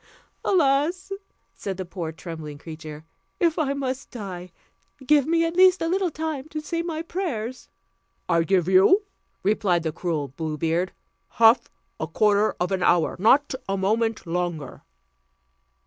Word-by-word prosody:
"Alas!" 325 Hz, +2 st, +2 dB, 0.4 s
said 195 Hz, -2 st, -5 dB
the 185 Hz, -, -4 dB
poor 175 Hz, -2 st, -5 dB
trembling 160 Hz, -3 st, -8 dB
creature, 155 Hz, 0 st, -9 dB, 0.3 s
"if 335 Hz, -2 st, +2 dB
I 280 Hz, -3 st, +1 dB
must 265 Hz, -1 st, -3 dB
die, 185 Hz, -6 st, -7 dB, 0.5 s
give 290 Hz, 0 st, +4 dB
me, 330 Hz, 0 st, +3 dB
as 330 Hz, -, -2 dB
least, 370 Hz, 0 st, +6 dB
a 330 Hz, -, -1 dB
little 370 Hz, +1 st, +1 dB
time 315 Hz, -2 st, -4 dB
to 310 Hz, -, -4 dB
say 335 Hz, +2 st, -3 dB
my 330 Hz, -2 st, -4 dB
prayers." 260 Hz, -, -4 dB, 0.6 s
"I 170 Hz, -1 st, +3 dB
give 180 Hz, 0 st, +2 dB
you," 190 Hz, -, +5 dB, 0.4 s
replied 190 Hz, -4 st, +2 dB
the 160 Hz, -, -1 dB
cruel 155 Hz, -4 st, -3 dB
Blue 155 Hz, +3 st, -4 dB
Beard, 165 Hz, +4 st, 0 dB, 0.4 s
"half 230 Hz, +1 st, +5 dB, 0.3 s
a 160 Hz, -, -2 dB
quarter 210 Hz, +4 st, +2 dB
of 180 Hz, +2 st, -1 dB
an 190 Hz, -1 st, 0 dB
hour: 175 Hz, -2 st, +3 dB
not 270 Hz, +9 st, +4 dB, 0.2 s
a 195 Hz, -, 0 dB
moment 220 Hz, +3 st, 0 dB
longer." 170 Hz, -5 st, -3 dB
210 Hz, 145 wpm, -24 LUFS, -, 0.6 s, least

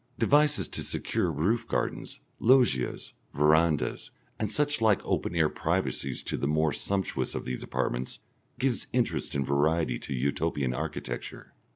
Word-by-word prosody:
Devices 150 Hz, +1 st, +3 dB
to -, -, -4 dB
secure 85 Hz, -, -1 dB
roof 90 Hz, +11 st, 0 dB
gardens, -, -, -3 dB, 0.2 s
loggias, 120 Hz, -, +2 dB, 0.2 s
verandahs, 75 Hz, +1 st, +2 dB, 0.3 s
and 110 Hz, -2 st, -1 dB
such 145 Hz, -4 st, 0 dB
like 110 Hz, -3 st, +4 dB
open 85 Hz, -, -1 dB
air 80 Hz, -2 st, +4 dB
privacies 70 Hz, -3 st, -2 dB
to -, -, -3 dB
the 70 Hz, -, -1 dB
more 80 Hz, 0 st, +2 dB
sumptuous 95 Hz, -1 st, -2 dB
of -, -, -4 dB
these 65 Hz, 0 st, -4 dB
apartments, 60 Hz, +1 st, -2 dB, 0.4 s
give 130 Hz, -2 st, 0 dB
interest 120 Hz, -, 0 dB
and 70 Hz, -1 st, 0 dB
variety 70 Hz, -1 st, +1 dB
to 70 Hz, -, -5 dB
Utopian 70 Hz, 0 st, 0 dB
architecture. 75 Hz, +4 st, -5 dB
80 Hz, 140 wpm, -28 LUFS, 70-110 Hz, 0.4 s, like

